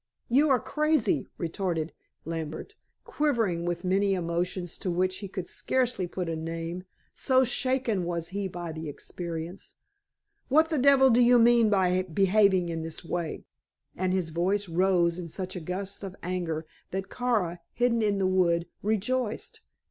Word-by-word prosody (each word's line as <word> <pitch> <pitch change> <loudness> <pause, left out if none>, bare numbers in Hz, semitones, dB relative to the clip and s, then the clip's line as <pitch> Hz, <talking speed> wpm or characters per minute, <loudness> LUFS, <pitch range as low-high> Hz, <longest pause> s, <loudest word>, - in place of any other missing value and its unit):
"You 285 +5 +4
are 260 -2 +4
crazy," 305 0 +1
retorted 170 -2 -2 0.3
Lambert, 165 - -5 0.3
quivering 235 - 0
with 175 0 -2
many 195 +1 +2
emotions 175 0 -2
to 190 - -3
which 185 +1 0
he 200 - -6
could 185 -2 -5
scarcely 250 -8 0
put 180 0 -4
a 165 - -2
name, 165 +3 -5 0.3
so 260 -1 +3
shaken 250 -5 0
was 170 -1 -3
he 195 +1 -2
by 175 -2 -6
the 160 -1 -6
experience. 170 +4 -7 0.7
"What 315 +4 +4
the 310 - +1
devil 265 0 +6
do 240 +2 +5
you 245 +1 +6
mean 235 -1 +5
by 185 -2 +3
behaving 190 0 +3
in 165 -1 -3
this 165 +1 -6
way?" 170 -2 -3 0.5
and 185 0 0
his 185 -3 0
voice 190 +5 0
rose 175 0 +2
in 170 -2 -6
such 185 +3 -5
a - - -3
gust 190 +4 -4
of 195 -1 -6
anger 170 -3 -2 0.2
that 190 +1 -4
Kara, 215 -9 0
hidden 240 -1 +1
in 205 -2 +2
the 195 - +1
wood, 175 -2 +2
rejoiced. 220 +3 -1
185 Hz, 155 wpm, -28 LUFS, 170-225 Hz, 0.7 s, devil